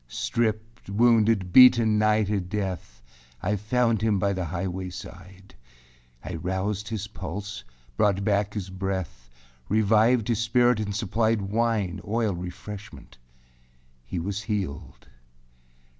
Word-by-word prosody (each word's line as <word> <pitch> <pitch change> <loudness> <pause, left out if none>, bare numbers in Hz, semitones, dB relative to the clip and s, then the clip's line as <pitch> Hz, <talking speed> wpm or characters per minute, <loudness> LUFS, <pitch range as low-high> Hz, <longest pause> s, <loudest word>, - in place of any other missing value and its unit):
5. - - -17
Stript, 110 -1 -2
wounded, 110 -3 +3
beaten 120 -4 +7
nigh 110 0 +3
to 105 0 0
death, 95 - -5 0.4
I 105 +10 -1
found 115 +2 +1
him 110 -2 +2
by 100 +1 +1
the 90 -2 -3
highway 90 +2 -4
side. 95 +1 -11 0.7
I 90 - -4
roused 95 +4 -2
his 105 -2 -4
pulse, 100 -3 -6 0.3
brought 100 -1 +2
back 100 0 0
his 95 -3 -4
breath, 95 -10 -4 0.4
Revived 110 +2 +3
his 115 -3 0
spirit, 120 0 +3
and 105 -2 -3
supplied 110 0 0
Wine, 105 -3 -1
oil, 110 -1 0
refreshmentâhe 90 +3 -8 1.1
was 100 +2 -3
healed. 95 - -4
105 Hz, 120 wpm, -26 LUFS, 95-110 Hz, 1.1 s, beaten